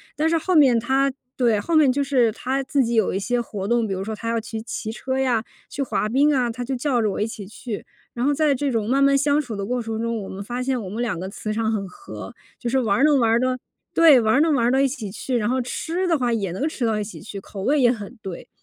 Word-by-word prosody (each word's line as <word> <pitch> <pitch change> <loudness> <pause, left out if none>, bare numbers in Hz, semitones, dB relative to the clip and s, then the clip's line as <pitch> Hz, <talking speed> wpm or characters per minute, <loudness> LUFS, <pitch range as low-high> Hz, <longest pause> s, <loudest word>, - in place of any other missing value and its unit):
但 315 +2 +1
是 330 - +3
后 365 +3 -1
面 260 -6 +6
她 270 +3 +1 0.2
对， 230 -5 +2
后 330 +8 -1
面 290 -4 +6
就 280 +2 0
是 255 -5 +2
她 265 +5 -2
自 270 0 +1
己 235 0 -1
有 220 -3 +2
一 190 - -1
些 240 +4 0
活 200 -4 -5
动， 235 -1 +2
比 195 - -2
如 190 - -3
说 220 +2 -4
她 230 +2 -5
要 230 0 +1
去 220 0 -6
骑 220 -1 -5
车 260 +3 -3
呀， 245 -4 +1 0.3
去 280 - -4
滑 235 -5 0
冰 280 +6 +3
啊， 245 -2 +1
她 245 +2 -5
就 260 +2 -2
叫 250 -2 0
着 215 - +1
我 195 - -3
一 210 - +1
起 210 -3 -7
去。 220 0 -6 0.3
然 240 - -3
后 285 - +3
在 295 0 +2
这 275 +1 -1
种 220 -2 -1
慢 275 +3 +3
慢 275 0 +5
相 290 +1 +2
处 235 -6 -6
的 200 0 -3
过 250 +1 -1
程 225 -1 -4
中， 230 -2 -2
我 - - -8
们 195 +1 -6
发 245 +4 -4
现 255 -1 0
我 - - -6
们 220 +5 -4
两 215 -8 -1
个 190 - -4
磁 215 +1 -5
场 220 0 0
很 195 -2 -2
合， 395 - -10 0.2
就 240 - -3
是 265 - +1
玩 225 +2 +2
能 295 -2 +5
玩 230 0 +3
的 255 0 +1 0.4
对， 315 -6 +7
玩 225 +5 +3
能 320 -1 +3
玩 240 -3 +2
到 - - +3
一 275 - +3
起 235 -7 -5
去， 245 +5 -2
然 210 -2 0
后 255 +1 +1
吃 330 +9 -2
的 330 -3 +2
话 240 -2 +1
也 200 -6 -1
能 270 - -1
吃 265 -6 -2
到 220 -1 +1
一 - - -1
起 205 - -9
去， 200 -2 -7
口 195 0 -9
味 290 +4 +2
也 245 -2 +5
很 225 +1 -4
对。 190 -3 -8
240 Hz, 305 characters per minute, -23 LUFS, 220-270 Hz, 0.4 s, 对